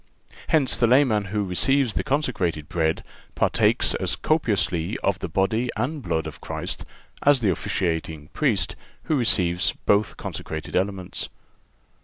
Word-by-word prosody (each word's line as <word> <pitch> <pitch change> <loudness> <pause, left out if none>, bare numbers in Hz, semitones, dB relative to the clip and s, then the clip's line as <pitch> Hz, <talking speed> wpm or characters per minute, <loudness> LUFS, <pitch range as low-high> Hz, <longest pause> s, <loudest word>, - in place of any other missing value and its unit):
Hence, 150 -5 +3
the 120 - +3
layman 120 -5 +4
who 105 +1 -1
receives 120 +6 +2
the - - -1
consecrated 100 - -1
Bread 80 -1 0 0.3
partakes - - +2
as - - -1
copiously 105 - 0
of 95 -1 +1
the - - -4
body 110 +8 +1
and 140 +7 -2
blood 85 -7 -1
of - - -8
Christ - - -5 0.4
as 140 -3 +4
the 105 -4 +3
officiating 80 -3 -2
Priest 110 - 0 0.3
who 155 - 0
receives 90 -9 +2
both 105 +1 +2
consecrated 80 -1 -6
elements. 95 -1 -2
100 Hz, 135 wpm, -24 LUFS, 85-125 Hz, 0.4 s, layman